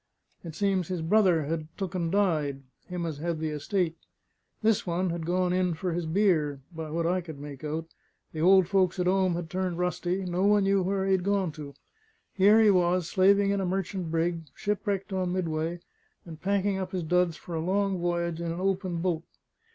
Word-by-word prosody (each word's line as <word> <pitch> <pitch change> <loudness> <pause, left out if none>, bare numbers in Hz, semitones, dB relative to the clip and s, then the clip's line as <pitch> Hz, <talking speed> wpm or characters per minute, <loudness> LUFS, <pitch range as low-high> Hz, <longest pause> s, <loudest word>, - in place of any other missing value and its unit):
It 165 -3 -8
seems 195 -4 0
his 180 -3 -3
brother 180 -3 +3
had 155 +1 -3
took 195 -2 -4
and 170 -3 -1
died, 155 -9 +1 0.2
him 180 -2 -4
as 155 -3 -4
had 170 +1 -2
the 160 0 -2
estate. 165 +3 -1 0.7
This 220 -3 +2
one 175 +1 0
had 165 -1 -4
gone 180 0 +1
in 180 -2 +1
for 175 +2 -2
his 170 -1 -2
beer, 160 -6 +2
by 160 -1 -6
what 165 +2 -1
I 180 +2 +1
could 160 -4 -9
make 140 -1 -9
out; 155 +2 -3 0.5
the 155 - -4
old 190 +1 +6
folks 190 -1 +2
at 180 - +1
'ome 185 -1 +2
had 170 -1 -4
turned 185 0 -2
rusty; 180 +1 -1
no 180 +1 -1
one 205 0 +4
knew 195 0 +3
where 190 +1 0
he 195 - +1
had 190 -2 +2
gone 195 -3 +1
to. 150 -2 -9 0.6
Here 205 +3 +5
he 215 -2 +6
was, 180 -2 +2
slaving 200 +2 +4
in 200 -1 0
a - - -1
merchant 185 -1 -2
brig, 165 0 -1
shipwrecked 205 -1 -2
on 185 -1 -1
Midway, 165 -1 -2 0.4
and 160 -2 -10
packing 200 0 0
up 190 - -5
his 180 -2 -2
duds 175 0 +1
for 175 - -9
a 165 - -1
long 195 +2 0
voyage 170 -1 -1
in 170 -1 -2
a 170 - -4
open 185 -3 -1
boat. 175 -3 0
180 Hz, 205 wpm, -28 LUFS, 165-190 Hz, 0.7 s, old